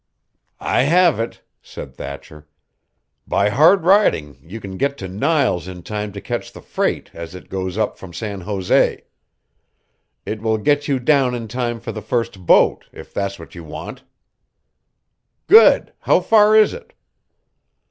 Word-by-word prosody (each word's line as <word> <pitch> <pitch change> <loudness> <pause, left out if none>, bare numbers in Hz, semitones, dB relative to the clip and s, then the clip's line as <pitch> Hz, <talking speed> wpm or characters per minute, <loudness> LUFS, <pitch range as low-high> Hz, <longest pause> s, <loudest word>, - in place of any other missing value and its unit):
"I - - +1
have 170 +1 +3
it," 115 - -5 0.2
said - - -10
Thatcher. 70 +1 -10 0.8
"By 100 +1 +1
hard 160 - +4
riding 175 - +2
you 95 +7 -9
can 95 -3 -8
get 140 +3 -1
to 95 - -6
Niles 100 - 0
in 90 -2 -9
time 105 +1 -5
to 100 - -7
catch - - -5
the - - -13
freight - - -2
as 85 +1 -9
it 90 - -12
goes 95 0 -4
up 110 -2 -2
from 95 - -10
San 100 +3 -6
Jose. 95 0 0 1.2
It 105 -1 -5
will 110 -1 0
get 145 +6 +1
you 140 - +1
down 130 -1 +2
in 115 -2 -6
time 120 0 -3
for 115 - -6
the 110 - -7
first 105 -5 -3
boat, - - +4
if - - -13
that's 100 0 -3
what 85 - -13
you 85 - -10
want." 80 - -9 1.4
"Good! 440 +5 +6
How - - +3
far 215 -1 +4
is 215 -1 +5
it?" 475 -1 -12
110 Hz, 160 wpm, -19 LUFS, 95-140 Hz, 1.4 s, Good